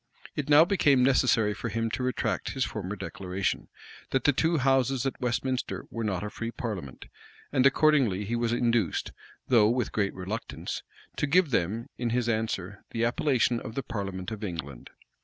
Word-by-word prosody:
[*] -, -, -17 dB
It 150 Hz, -1 st, -3 dB
now 150 Hz, +2 st, +8 dB
became 145 Hz, -9 st, +4 dB
necessary 125 Hz, -5 st, +3 dB
for 115 Hz, +3 st, -4 dB
him 115 Hz, +1 st, -1 dB
to -, -, -2 dB
retract 120 Hz, -6 st, -1 dB
his 130 Hz, -1 st, 0 dB
former 105 Hz, -2 st, -4 dB
declaration, 95 Hz, -1 st, -3 dB, 0.4 s
that 135 Hz, -2 st, 0 dB
the 145 Hz, -, +4 dB
two 160 Hz, +5 st, +2 dB
houses 135 Hz, -1 st, +2 dB
at 135 Hz, -, -3 dB
Westminster 125 Hz, +1 st, -1 dB
were 115 Hz, -, -3 dB
not 100 Hz, -3 st, -1 dB
a 105 Hz, -, -4 dB
free 115 Hz, -, -4 dB
parliament; 100 Hz, -, -6 dB, 0.5 s
and 135 Hz, -1 st, +5 dB
accordingly 135 Hz, -9 st, +3 dB
he 115 Hz, +4 st, -1 dB
was 120 Hz, -1 st, 0 dB
induced, 120 Hz, -6 st, +1 dB, 0.4 s
though 110 Hz, -4 st, +5 dB
with 120 Hz, +1 st, 0 dB
great 100 Hz, -2 st, 0 dB
reluctance, 95 Hz, +5 st, -5 dB, 0.4 s
to 145 Hz, -, 0 dB
give 170 Hz, 0 st, +3 dB
them, 110 Hz, +3 st, 0 dB
in 120 Hz, -1 st, 0 dB
his 120 Hz, 0 st, 0 dB
answer, 110 Hz, -4 st, -2 dB
the 115 Hz, 0 st, 0 dB
appellation 120 Hz, -1 st, +2 dB
of 110 Hz, -, -8 dB
the 135 Hz, -, -2 dB
parliament 95 Hz, -4 st, -4 dB
of 110 Hz, -1 st, -6 dB
England. 75 Hz, -, -6 dB
115 Hz, 175 wpm, -28 LUFS, 105-130 Hz, 0.5 s, now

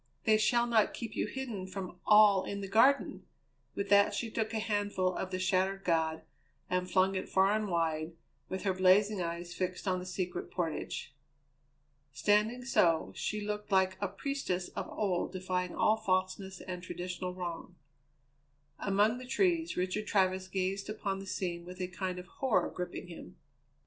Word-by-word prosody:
They 215 Hz, -1 st, +4 dB
shall 235 Hz, +2 st, +3 dB
not 230 Hz, -3 st, +2 dB
keep 230 Hz, -3 st, -6 dB
you -, -, 0 dB
hidden 220 Hz, -6 st, -5 dB
from 185 Hz, -2 st, -7 dB
all 210 Hz, -2 st, +7 dB
in 200 Hz, 0 st, -4 dB
the 195 Hz, -, -4 dB
Garden!" 230 Hz, +8 st, +3 dB, 0.5 s
With 200 Hz, 0 st, -3 dB
that 200 Hz, 0 st, +5 dB
she 230 Hz, -2 st, -3 dB
took 220 Hz, -1 st, -1 dB
a 225 Hz, -, -1 dB
handful 205 Hz, -4 st, 0 dB
of 190 Hz, -, -3 dB
the 185 Hz, -, -2 dB
shattered 190 Hz, +1 st, +1 dB
god 160 Hz, -3 st, +1 dB, 0.5 s
and 180 Hz, 0 st, 0 dB
flung 185 Hz, +2 st, +3 dB
it 185 Hz, -, -3 dB
far 190 Hz, +1 st, +4 dB
and 215 Hz, 0 st, 0 dB
wide, 165 Hz, -2 st, -1 dB, 0.4 s
with 190 Hz, -, -4 dB
her 195 Hz, -2 st, +1 dB
blazing 190 Hz, +2 st, +4 dB
eyes 170 Hz, +1 st, -4 dB
fixed 185 Hz, +2 st, -3 dB
on 185 Hz, -1 st, +1 dB
the 180 Hz, -, -7 dB
Secret 180 Hz, -1 st, -3 dB
Portage. 165 Hz, -5 st, -3 dB, 1.0 s
Standing 210 Hz, -, +2 dB
so, 165 Hz, -10 st, +3 dB
she 210 Hz, 0 st, -2 dB
looked 210 Hz, 0 st, -4 dB
like 190 Hz, -1 st, +3 dB
a 200 Hz, -, +1 dB
priestess 195 Hz, -3 st, -3 dB
of -, -, -5 dB
old 185 Hz, -5 st, -1 dB
defying 180 Hz, -1 st, -2 dB
all 215 Hz, -, +3 dB
falseness 190 Hz, -2 st, -1 dB
and 180 Hz, -1 st, -6 dB
traditional 180 Hz, 0 st, -5 dB
wrong. 175 Hz, -1 st, -6 dB, 1.0 s
Among 210 Hz, +4 st, +2 dB
the 255 Hz, -, -9 dB
trees 340 Hz, +2 st, +1 dB
Richard 185 Hz, +4 st, -1 dB
Travers 185 Hz, -1 st, +2 dB
gazed 190 Hz, +1 st, -2 dB
upon 200 Hz, -2 st, -3 dB
the 195 Hz, -, -8 dB
scene 175 Hz, -2 st, -3 dB
with 180 Hz, +1 st, -10 dB
a 180 Hz, -, -1 dB
kind 185 Hz, 0 st, -4 dB
of 180 Hz, -, -7 dB
horror 210 Hz, -1 st, 0 dB
gripping 180 Hz, -1 st, -5 dB
him. 175 Hz, -2 st, -10 dB
190 Hz, 170 wpm, -32 LUFS, 180-210 Hz, 1.0 s, all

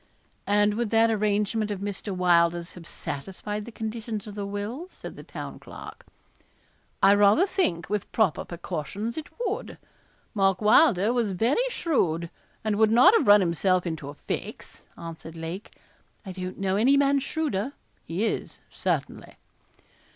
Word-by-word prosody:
'And 205 Hz, 0 st, +3 dB
would 235 Hz, -2 st, 0 dB
that 225 Hz, +1 st, +4 dB
arrangement 210 Hz, 0 st, 0 dB
of 205 Hz, -2 st, -3 dB
Mr. 200 Hz, +1 st, -4 dB
Wylder's 175 Hz, -2 st, +2 dB
have 170 Hz, -2 st, -12 dB
satisfied 195 Hz, +7 st, -5 dB
the 235 Hz, -, -9 dB
conditions 220 Hz, -1 st, -5 dB
of 210 Hz, -, -8 dB
the 200 Hz, -1 st, -4 dB
will?' 210 Hz, -, -4 dB
said -, -, -10 dB
the -, -, -9 dB
Town -, -, -8 dB
Clerk. -, -, -11 dB, 1.0 s
'I 195 Hz, +1 st, +8 dB
rather 205 Hz, -, +5 dB
think, 360 Hz, -, -1 dB
with 205 Hz, -1 st, -3 dB
proper 215 Hz, -8 st, +2 dB
precautions, 180 Hz, +6 st, -5 dB
it 315 Hz, -2 st, -5 dB, 0.2 s
would. 430 Hz, 0 st, -3 dB, 0.6 s
Mark 195 Hz, -3 st, +2 dB
Wylder 215 Hz, -, +5 dB
was 230 Hz, -5 st, 0 dB
very 260 Hz, -, +1 dB
shrewd, 170 Hz, -, 0 dB, 0.3 s
and 215 Hz, -2 st, 0 dB
would 220 Hz, 0 st, +5 dB
not 250 Hz, -, +7 dB
have 390 Hz, -, +3 dB
run 205 Hz, 0 st, +8 dB
himself 180 Hz, +1 st, +1 dB
into 160 Hz, -4 st, -4 dB
a 145 Hz, -, -9 dB
fix,' -, -, -6 dB, 0.2 s
answered 165 Hz, -1 st, -8 dB
Lake. 165 Hz, +5 st, -7 dB, 0.5 s
'I 190 Hz, -, -6 dB
don't 185 Hz, 0 st, -6 dB
know 195 Hz, 0 st, 0 dB
any 265 Hz, +6 st, +4 dB
man 280 Hz, 0 st, +3 dB
shrewder; 275 Hz, -5 st, -2 dB, 0.3 s
he 180 Hz, +7 st, -2 dB
is, -, -, -3 dB
certainly.' -, -, -3 dB
205 Hz, 150 wpm, -26 LUFS, 180-230 Hz, 1.0 s, I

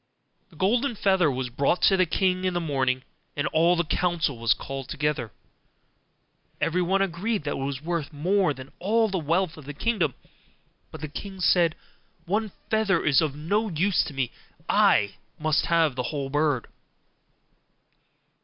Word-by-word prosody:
The 170 Hz, -, -20 dB
golden 235 Hz, -, +1 dB
feather 190 Hz, -5 st, +3 dB
was 130 Hz, -2 st, -3 dB
brought 140 Hz, +8 st, +1 dB
to 195 Hz, -, +6 dB
the 185 Hz, -1 st, +3 dB
king 185 Hz, +2 st, +1 dB
in 185 Hz, -1 st, 0 dB
the -, -, +2 dB
morning, 130 Hz, -5 st, 0 dB, 0.3 s
and 145 Hz, -, -1 dB
all 170 Hz, +3 st, +3 dB
the 170 Hz, -, +1 dB
council 165 Hz, -5 st, 0 dB
was 115 Hz, 0 st, +3 dB
called 135 Hz, -1 st, -7 dB
together. 145 Hz, -7 st, -1 dB, 1.3 s
Everyone 180 Hz, +3 st, +1 dB
agreed 195 Hz, +3 st, -2 dB
that 145 Hz, -, -2 dB
it -, -, -2 dB
was 135 Hz, +1 st, -4 dB
worth 165 Hz, -3 st, -2 dB
more 180 Hz, +4 st, +1 dB
than 135 Hz, 0 st, -8 dB
all 220 Hz, +4 st, +2 dB
the 190 Hz, -2 st, -1 dB
wealth 170 Hz, +2 st, 0 dB
of 155 Hz, -, -11 dB
the 145 Hz, 0 st, -7 dB
kingdom: 190 Hz, -, 0 dB, 0.7 s
but -, -, -10 dB
the 155 Hz, -, -3 dB
king 190 Hz, +6 st, -8 dB
said, 175 Hz, -2 st, +3 dB, 0.5 s
'One 210 Hz, +3 st, -1 dB, 0.2 s
feather 215 Hz, -6 st, +2 dB
is 140 Hz, -1 st, +5 dB
of 150 Hz, -3 st, -1 dB
no 205 Hz, +9 st, 0 dB
use 185 Hz, +2 st, +2 dB
to 145 Hz, -, -8 dB
me, 130 Hz, -3 st, -1 dB, 0.4 s
I 100 Hz, -1 st, +3 dB, 0.2 s
must 155 Hz, -2 st, +1 dB
have 165 Hz, -4 st, +3 dB
the 125 Hz, -, -1 dB
whole 140 Hz, -3 st, -4 dB
bird. 145 Hz, -4 st, +1 dB
165 Hz, 165 wpm, -26 LUFS, 145-190 Hz, 1.3 s, to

